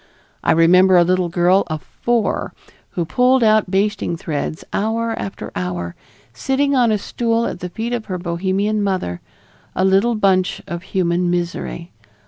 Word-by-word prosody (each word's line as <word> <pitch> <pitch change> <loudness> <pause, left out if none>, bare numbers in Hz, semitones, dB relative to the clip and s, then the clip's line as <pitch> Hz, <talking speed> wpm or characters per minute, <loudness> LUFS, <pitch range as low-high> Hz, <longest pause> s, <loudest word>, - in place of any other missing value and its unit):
I - - +3
remember 180 +3 +5
a 175 - +6
little 180 0 +1
girl 175 +3 +3
of 155 -4 -4
four 235 - -1 0.4
who 175 - -1
pulled 250 +7 +3
out 215 -3 +3
basting 195 -2 0
threads 155 -2 -4
hour 225 +2 0
after 195 - -6
hour, 90 -1 -3 0.4
sitting 275 - 0
on 240 -3 +3
a 215 - +2
stool 230 +2 -1
at - - -4
the 180 - -5
feet 225 +6 -4
of 235 -3 -3
her 185 -3 -4
Bohemian 190 +5 -1
mother, 185 - -2 0.5
a 185 - +2
little 195 +5 +3
bunch 190 -3 +2
of 170 0 -5
human 180 -1 0
misery. 175 0 -3
190 Hz, 155 wpm, -19 LUFS, 170-215 Hz, 0.5 s, a